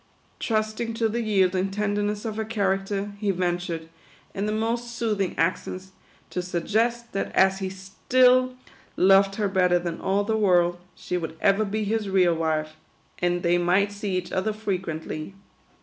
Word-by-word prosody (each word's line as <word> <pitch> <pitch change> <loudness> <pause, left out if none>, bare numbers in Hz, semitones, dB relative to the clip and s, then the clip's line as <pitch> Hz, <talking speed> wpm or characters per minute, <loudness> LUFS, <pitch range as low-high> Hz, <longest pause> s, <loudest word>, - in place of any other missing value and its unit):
Trusting 220 +1 -1
to 225 0 +1
the 235 +2 -2
yielding 190 -3 +2
tenderness 205 +1 -1
of 220 -2 -3
her 220 - -1
character, 200 -1 -1
he 205 -1 -1
ventured, 175 -3 -1 0.5
in 200 +2 -2
the - - 0
most 230 +2 -2
soothing 210 -5 -1
accents, 185 +2 -2 0.4
to 180 - -2
suggest 225 +7 -1
that 195 - -2
as 190 0 +4
he 190 -1 -2
still 190 +1 -12 0.2
THE 255 0 +7
QUADROONS. 255 0 -15 0.4
67 185 - +3
loved 195 0 +5
her 210 -1 0
better 180 -2 +3
than 170 -1 -4
all 195 +2 +1
the 220 +2 0
world, 175 -4 +3 0.2
she 180 - -3
would 160 -2 -5
ever 200 +1 +3
be 215 +1 -2
his 210 0 -1
real 185 -3 +4
wife, 155 -1 -1 0.5
and 175 0 0
they 175 0 +3
might 185 +4 +2
see 200 -2 -3
each 180 - -4
other 200 +3 0
frequent 185 -7 -3
ly. 155 +5 -5
195 Hz, 175 wpm, -25 LUFS, 180-215 Hz, 0.5 s, THE